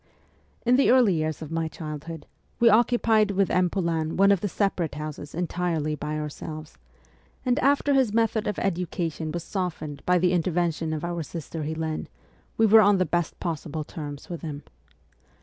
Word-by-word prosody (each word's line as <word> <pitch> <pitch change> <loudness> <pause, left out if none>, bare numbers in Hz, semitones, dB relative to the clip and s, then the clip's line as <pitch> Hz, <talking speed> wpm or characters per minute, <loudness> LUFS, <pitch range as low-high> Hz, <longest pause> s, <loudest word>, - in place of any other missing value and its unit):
In 245 +1 +5
the 275 - +4
early 245 -6 +5
years 155 -1 -2
of 155 - -9
my 165 0 -1
childhood 155 0 -7 0.3
we 235 - +6
occupied 225 -1 +4
with 195 -1 +1
M. 180 0 +3
Poulain 165 -4 -1
one 195 +1 +6
of 195 -3 +2
the 205 - 0
separate 180 -6 -1
houses 150 -1 -6
entirely 170 -3 -1
by 150 +1 -3
our 150 0 -2
selves; 155 - -8 0.7
and 250 +3 +2
after 285 +1 +3
his 260 -5 +3
method 225 -1 +1
of 210 - -2
education 170 -3 -2
was 170 +1 -4
softened 160 -7 -4
by 180 0 +5
the 180 0 +2
intervention 170 -2 0
of 155 +1 -3
our 175 -1 -2
sister 160 0 -6
Helene, 160 +1 -3 0.5
we 225 - +5
were 220 +1 +8
on 205 -1 +5
the 185 - +2
best 175 -2 -1
possible 160 -2 -3
terms 145 -2 -8
with 170 -2 -6
him. 150 -3 -6
170 Hz, 175 wpm, -26 LUFS, 155-200 Hz, 0.7 s, were